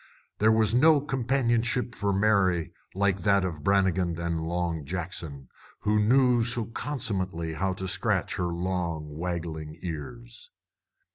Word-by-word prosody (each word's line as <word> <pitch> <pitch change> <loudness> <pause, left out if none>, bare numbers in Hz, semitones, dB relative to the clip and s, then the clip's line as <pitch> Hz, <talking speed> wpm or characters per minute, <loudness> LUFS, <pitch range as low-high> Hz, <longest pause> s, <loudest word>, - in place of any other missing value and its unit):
There 110 +1 +5
was 110 -1 +3
no 150 +4 +6
companionship 125 -3 0
for 100 -2 -1
Mary 95 -4 +2 0.2
like 100 -1 +1
that 100 +1 +3
of 80 -5 -5
Brannigan 95 -3 +2
and 85 -1 -2
Long 85 -1 -2
Jackson, 80 -4 -5 0.3
who 105 0 +2
knew 125 +2 +4
so 115 0 0
consummately 95 - -3
how 95 +3 -1
to 95 0 -5
scratch - - 0
her 90 - 0
long, 85 -4 -3
waggling 80 -2 -4
ears. 115 - -7
95 Hz, 130 wpm, -27 LUFS, 85-115 Hz, 0.3 s, no